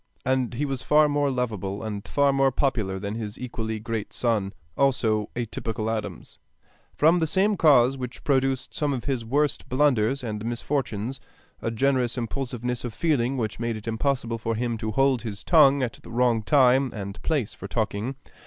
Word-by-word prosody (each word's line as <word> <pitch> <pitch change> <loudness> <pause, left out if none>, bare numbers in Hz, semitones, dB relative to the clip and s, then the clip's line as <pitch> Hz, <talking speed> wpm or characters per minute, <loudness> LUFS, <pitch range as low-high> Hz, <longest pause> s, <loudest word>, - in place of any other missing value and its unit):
And 130 -2 0
he 145 +5 -1
was 135 -3 -3
far 150 0 +4
more 145 -1 +1
lovable 105 -6 -3
and 105 -2 -5
far 140 -1 +2
more 135 0 +3
popular 115 -8 0
than 100 +2 -4
his 110 -1 -5
equally 115 -3 -4
great 110 -1 -4
son, 110 -5 0 0.2
also 115 -6 +1
a 120 0 -1
typical 110 0 -3
Adams, 110 -1 -5 0.5
from 165 +4 +4
the 160 - +1
same 200 +6 +2
cause 135 -6 +4
which 125 -1 -6
produced 135 -2 0
some 145 -2 0
of 125 -4 -4
his 130 -5 -1
worst 145 +5 0
blunders 130 -1 +2
and 105 -3 -4
misfortunes, 120 0 -2 0.4
a - - -1
generous 125 +1 +1
impulsiveness 125 0 -3
of 120 -3 -5
feeling 135 -3 +1
which 110 -3 -3
made 115 -1 -1
it 110 +1 -9
impossible 115 0 -1
for 115 0 -2
him 120 +1 -1
to 110 - -3
hold 135 +2 +2
his 105 -3 -5
tongue 140 -5 +5
at 120 - -4
the - - -13
wrong 120 -1 +2
time 130 +2 +4
and 100 -1 -6
place 145 -10 -1
for 100 - -8
talking. 110 +4 -2
125 Hz, 180 wpm, -25 LUFS, 110-135 Hz, 0.5 s, tongue